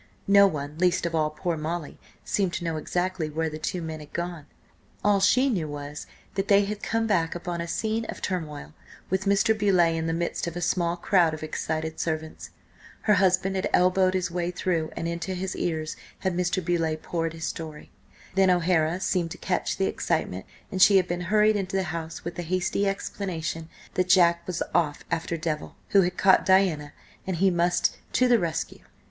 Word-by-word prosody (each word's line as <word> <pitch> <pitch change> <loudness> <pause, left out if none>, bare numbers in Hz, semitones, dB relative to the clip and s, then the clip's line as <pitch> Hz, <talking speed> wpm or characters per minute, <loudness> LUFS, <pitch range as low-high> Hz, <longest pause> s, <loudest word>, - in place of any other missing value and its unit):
No 200 0 +7
one, 150 -2 -5
least 180 -1 +2
of 170 - -2
all 155 -2 +2
poor 165 +2 -2
Molly, 160 0 -4 0.3
seemed 190 -4 0
to 175 - -3
know 165 -2 -2
exactly 175 +1 -2
where 160 +1 -2
the 155 - -6
two 175 +2 -3
men 160 -1 -5
had 150 -1 -12
gone. 170 -4 -4 0.6
All 205 -1 +4
she 250 +7 +4
knew 185 - 0
was 145 0 -7 0.3
that 195 0 -2
they 200 0 +5
had 205 +1 -4
come 225 0 0
back 175 -7 +1
upon 175 -1 -4
a 170 - -4
scene 220 +6 -1
of - - -6
turmoil, 150 - -4 0.4
with 190 +1 0
Mr. 200 +3 +3
Beauleigh 185 -6 +3
in 160 0 -2
the 165 - 0
midst 170 +1 -2
of 170 - -5
a - - -3
small 175 -1 0
crowd 170 -3 +3
of 155 - -9
excited 160 0 -3
servants. 160 -1 -3 0.5
Her 210 - +3
husband 190 0 +3
had 190 - -1
elbowed 185 +1 +4
his 185 -1 -1
way 175 0 -1
through, 175 -3 -1
and 165 - -2
into 170 +2 -3
his 185 +1 -3
ears 155 -2 -2 0.3
had 190 -2 0
Mr. 180 0 0
Beauleigh 165 -2 0
poured 165 0 -3
his 160 0 -5
story. 155 -2 -6 0.4
Then 190 0 +4
O'Hara 175 -1 +2
seemed 175 -3 0
to - - -7
catch - - -1
the - - +1
excitement, 90 +1 -2 0.2
and 190 -2 -2
she 195 +1 +8
had 185 -2 +2
been 175 0 -2
hurried 215 +1 +4
into 195 -1 -2
the 190 - +2
house 165 -1 -6
with 170 - -3
the - - -2
hasty 185 +3 0
explanation 170 -5 -3 0.2
that 185 0 0
Jack 170 -2 +4
was 180 - -1
off 150 -4 +1
after 165 0 -1
Devil, 155 -2 -3
who 200 - +6
had 175 -1 -1
caught 190 -1 +5
Diana, 180 -6 +3 0.4
and 190 - -1
he 190 +3 +3
must 175 0 +1 0.2
to 255 - +4
the 240 -2 +5
rescue. 165 -3 -3
175 Hz, 200 wpm, -26 LUFS, 160-190 Hz, 0.6 s, she